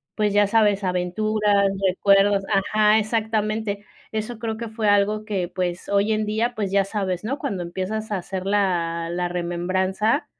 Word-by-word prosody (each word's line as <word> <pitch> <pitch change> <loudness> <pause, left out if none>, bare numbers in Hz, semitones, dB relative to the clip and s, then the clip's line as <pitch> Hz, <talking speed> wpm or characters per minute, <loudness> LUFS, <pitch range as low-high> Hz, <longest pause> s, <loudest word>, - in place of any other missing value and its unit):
pues 210 -2 +1
ya 205 0 +4
sabes, 205 -2 +3
aventuras, 200 +3 +1 0.2
recuerdos 195 +1 +3
Ajá, 210 +2 +3
exactamente. 215 -1 -1 0.3
Eso 220 +1 -4
creo 220 -1 -3
que 230 0 -5
fue 220 -1 0
algo 205 +1 +2
que, 195 -5 -2
pues 180 0 -4
hoy 200 +2 +2
en 215 0 0
día, 225 +3 -1
pues 200 -3 -2
ya 195 -1 +3
sabes, 195 -3 -3
¿no?, 270 +6 -2
cuando 205 -11 -3
empiezas 195 +5 -4
a 205 - 0
hacer 185 +1 -5
la 170 -4 0
la 175 +1 -1
remembranza 185 - -1
205 Hz, 160 wpm, -23 LUFS, 185-215 Hz, 0.3 s, ya